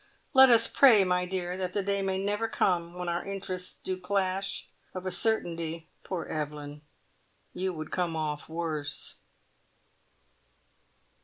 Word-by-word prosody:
Let 265 -1 +9
us 230 -1 +6
pray, 235 -8 +7
my 180 -1 +1
dear, 180 -1 -3
that 185 -1 -3
the 200 - 0
day 200 0 0
may 190 -1 0
never 205 +3 0
come 175 -5 0
when 180 0 -4
our 170 0 -1
interests 185 -2 -5
do 185 0 -4
clash. 190 +1 -1 0.3
Of 185 0 -5
a 185 - -1
certainty, 170 -5 -1
poor 180 -3 -4
Evelyn, 150 -1 -5 0.7
you 190 +1 -1
would 155 -3 -7
come 175 -3 -1
off 150 -1 -3
worse!" 160 -3 -3
180 Hz, 140 wpm, -29 LUFS, 165-195 Hz, 0.7 s, Let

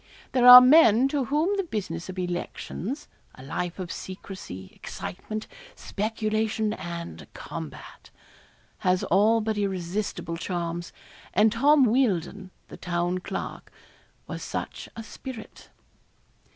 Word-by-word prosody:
There 250 -1 +4
are 250 0 +14
men 255 -3 +6
to 275 -2 0
whom 310 - +1
the 390 - +1
business 185 - -5
of 185 - -7
elections 180 - -4 0.3
a 130 - -12
life 175 +5 -4
of 185 -3 -5
secrecy, 185 - -8
excitement, 215 +4 -6 0.3
speculation, 215 +1 -1
and 170 -3 -7
combat - - -9 0.7
has 185 -1 +1
all 215 +5 +3
but 215 -1 -1
irresistible 185 -3 -3
charms; 170 -1 -4 0.4
and 210 +3 +5
Tom 280 +4 +5
Wealdon, 200 -6 0 0.2
the - - -11
Town 175 0 -1
Clerk, - - -6 0.5
was - - -6
such - - -5
a 225 - -6
spirit. 225 +1 -10
205 Hz, 115 wpm, -26 LUFS, 180-230 Hz, 0.7 s, are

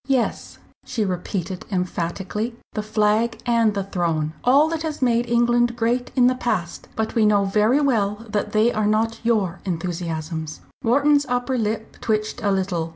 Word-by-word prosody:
"Yes," 260 -4 -1 0.3
she 225 -4 -2
repeated 185 0 -3
emphatically, 185 +5 -2 0.2
"the 215 - -2
Flag 215 +2 +1
and 230 -3 +2
the 200 - -1
Throne 165 -5 -1
all 280 +5 +5
that 325 -1 -2
has 315 -2 -3
made 240 -2 +1
England 240 0 +3
great 245 +1 0
in 250 -2 +5
the 255 - +5
past. 210 -9 -3
But 220 0 -2
we 225 - +3
know 205 -1 +4
very 215 +8 +3
well 220 -5 0
that 210 0 -2
they 220 +3 +3
are 215 -1 +1
not 225 +2 +1
your 205 -6 +1
enthusiasms." 165 -3 -4 0.2
Wharton's 285 +4 +3
upper 245 +1 0
lip 220 -1 -2
twitched 215 -1 -1
a 205 - +1
little. 185 -4 -1
215 Hz, 160 wpm, -22 LUFS, 190-240 Hz, 0.3 s, all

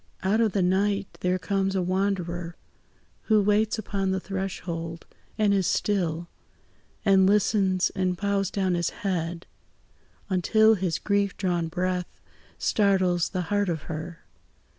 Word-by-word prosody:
Out 205 +4 +2
of 220 -3 +2
the 195 - +2
night 195 +2 0
there 180 0 +1
comes 195 0 -1
a 190 - +1
wanderer, 180 -2 -2 0.7
Who 215 -1 +4
waits 210 +2 +2
upon 195 -2 -2
the 190 0 0
threshold, 180 -4 -5 0.3
and 210 -2 +3
is 190 -3 +2
still; 170 -5 0 0.8
And 190 -2 +5
listens, 195 -2 +2
and 185 -1 -1
bows 200 0 0
down 190 -2 0
his 175 0 0 0.2
head, 170 -2 -2 0.8
until 215 +4 +4
His 180 -5 -1
grief 200 -1 0
drawn 175 -3 0
breath 180 +1 -3 0.4
startles 185 -4 +2
the 185 - -2
heart 205 -2 +1
of 160 -3 -3
her. 160 +2 -7
190 Hz, 135 wpm, -26 LUFS, 175-200 Hz, 0.8 s, And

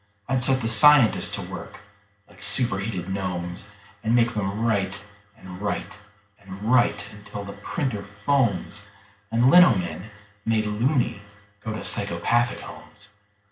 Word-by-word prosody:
I'd 130 -1 0
set 130 0 +2
the 115 - -1
scientists 120 +2 +5
to - - -5
work - - -8 0.5
like - - -19
superheated 105 -4 +1
gnomes, 90 -1 -4 0.4
And 115 +1 +2
make 120 0 +3
them 105 +1 -2
write 100 -3 -1 0.3
and 95 -2 -11
write 105 0 -4 0.4
and 100 0 -10
write 125 -2 +2
until 105 0 -9
the 100 - -7
printer 105 +1 -3
foams 105 0 -1 0.4
And 120 +3 +4
lino 175 -10 +8
men, 90 +2 -5 0.3
made 110 -1 +1
"loony", 120 +1 0 0.4
go 110 - -4
to 105 - -6
psychopathic 105 +5 0
homes. 105 0 -13
105 Hz, 135 wpm, -24 LUFS, 100-120 Hz, 0.5 s, lino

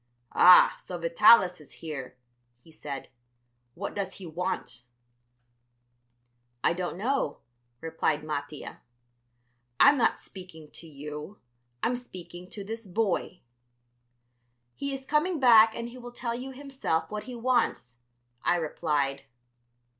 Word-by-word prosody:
"Ah, 180 0 +8
so 180 - -7
Vitalis 180 +1 +5
is 145 - -15
here," 140 -6 -7 0.4
he 160 - -20
said; 140 -3 -7 0.7
"what 200 - -5
does 195 -2 -4
he 195 - -10
want?" 160 -7 -4 1.8
"I - - +3
don't 175 0 -4
know," 235 - -1 0.4
replied 160 -2 -1
Mattia. 150 -1 -6 1.0
"I'm 285 -1 +7
not 230 - +3
speaking 180 -5 -12
to 165 - -12
you, 150 +5 -8 0.5
I'm 245 - +1
speaking 180 -6 -10
to 205 - -7
this 225 +1 -7
boy." 185 -2 -1 1.3
"He 280 - -4
is 270 -1 -6
coming 310 +4 +1
back 225 -4 +7
and 235 0 -5
he 250 +1 -11
will 245 0 -9
tell 240 -1 -4
you 250 +3 -6
himself 265 - -3
what 210 0 -5
he 250 - -7
wants," 230 - 0 0.4
I - - +2
replied. 150 -4 -1
180 Hz, 125 wpm, -28 LUFS, 155-235 Hz, 1.8 s, Ah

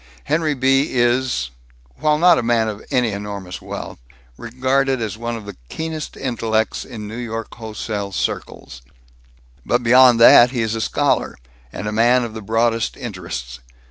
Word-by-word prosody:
Henry 155 - 0
B. 135 +2 +2
is 120 - +1 0.5
while 150 0 +2
not 175 +1 +5
a - - 0
man 115 -1 +1
of 105 -1 -6
any 125 -3 +1
enormous 100 -2 -6
wealth - - -7 0.4
regarded 130 - 0
as 110 -2 -3
one 115 +1 -4
of 110 -2 -8
the 100 -2 -9
keenest 160 -1 -5
intellects 110 -4 -1
in 110 -5 -8
New 110 - -7
York 115 -2 -5
wholesale 110 -3 -5
circles. - - -5 0.8
But 120 - 0
beyond 125 0 +6
that, 120 +1 +8
he 120 -2 -2
is 110 0 -2
a 115 - -2
scholar, - - 0 0.3
and 105 - -6
a - - -2
man 120 +3 +3
of 115 -2 -6
the 110 - -7
broadest 115 +2 0
interests. 85 - -7
115 Hz, 160 wpm, -20 LUFS, 110-130 Hz, 0.8 s, that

